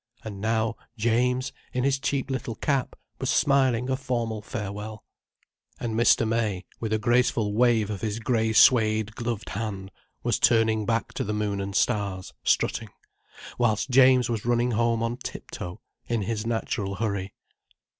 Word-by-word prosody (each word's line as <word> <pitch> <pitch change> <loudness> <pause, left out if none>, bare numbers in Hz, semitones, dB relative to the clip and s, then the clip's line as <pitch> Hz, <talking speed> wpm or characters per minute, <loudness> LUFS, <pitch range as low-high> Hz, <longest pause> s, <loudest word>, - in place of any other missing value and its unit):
And 100 -3 -7
now 110 0 0 0.2
James, 125 +4 +1 0.2
in 125 - 0
his 135 0 +2
cheap 135 -1 -1
little 120 -3 -3
cap, 135 0 -1 0.2
was - - -2
smiling 130 -4 +3
a 130 - +1
formal 120 -5 -2
farewell. 105 -1 -6 0.8
And 115 -2 -3
Mr. 115 0 +4
May, 110 -5 -1
with 110 -2 -3
a 110 - +3
graceful 120 -2 +2
wave 115 -2 +3
of 100 - -5
his 110 -1 -2
grey 110 -1 0
suède 110 -1 +4
gloved 115 -2 -4
hand, 100 -2 -4 0.3
was - - +1
turning 110 -2 +3
back 115 0 -1
to - - -2
the 105 +1 -2
Moon 105 -2 -1
and 100 0 -5
Stars, 100 -4 0
strutting, - - +1 0.7
whilst 115 +1 +1
James 130 -1 +6
was 115 -3 -2
running 120 +1 +1
home 115 0 +1
on 115 +1 -2
tip 130 - -8
toe, 90 0 -7 0.3
in 115 -3 0
his 110 +2 -3
natural 105 -3 -2
hurry. 100 -2 -3
115 Hz, 155 wpm, -26 LUFS, 105-120 Hz, 0.8 s, James